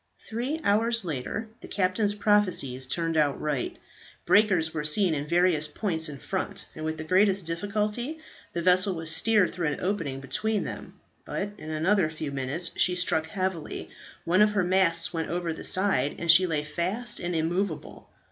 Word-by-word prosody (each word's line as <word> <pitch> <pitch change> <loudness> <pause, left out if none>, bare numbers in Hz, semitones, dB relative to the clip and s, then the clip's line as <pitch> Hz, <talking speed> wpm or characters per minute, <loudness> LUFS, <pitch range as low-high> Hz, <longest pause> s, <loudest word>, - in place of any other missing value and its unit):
Three 250 +8 -4
hours 225 +1 +2
later, 165 - -4
the - - -11
captain's 200 +2 0
prophecies 185 -12 +1
turned 165 +3 -2
out 150 -3 +2
right. 150 -4 -2 0.5
Breakers 185 -7 +3
were 150 -2 -3
seen 165 +4 +3
in 145 0 -3
various 170 -2 +2
points 160 -3 -2
in 145 - -7
front, 195 +6 -4
and 155 - -8
with 160 0 -3
the 155 - -5
greatest 190 +2 +3
difficulty 210 - -2 0.4
the 170 - -2
vessel 185 +1 +4
was 165 -1 -1
steered 210 +2 +3
through 175 -3 -2
an 150 - -2
opening 165 -9 -2
between 210 - -1
them; - - -8 0.2
but 200 +1 -4
in 155 - -8
another 165 +3 +1
few 155 -2 -6
minutes 140 +6 -1
she 180 - +3
struck 160 -3 +1
heavily, 185 -2 -4 0.3
one 180 +4 +3
of 210 0 +4
her 200 -3 +2
masts 175 -2 +2
went 165 -1 -3
over 175 -1 -2
the - - -9
side, 185 -8 +2
and 170 -1 +4
she 185 +3 +6
lay 155 -3 -1
fast 180 +10 -2
and 175 -1 -3
immovable. 170 +2 -3
175 Hz, 175 wpm, -27 LUFS, 155-200 Hz, 0.5 s, she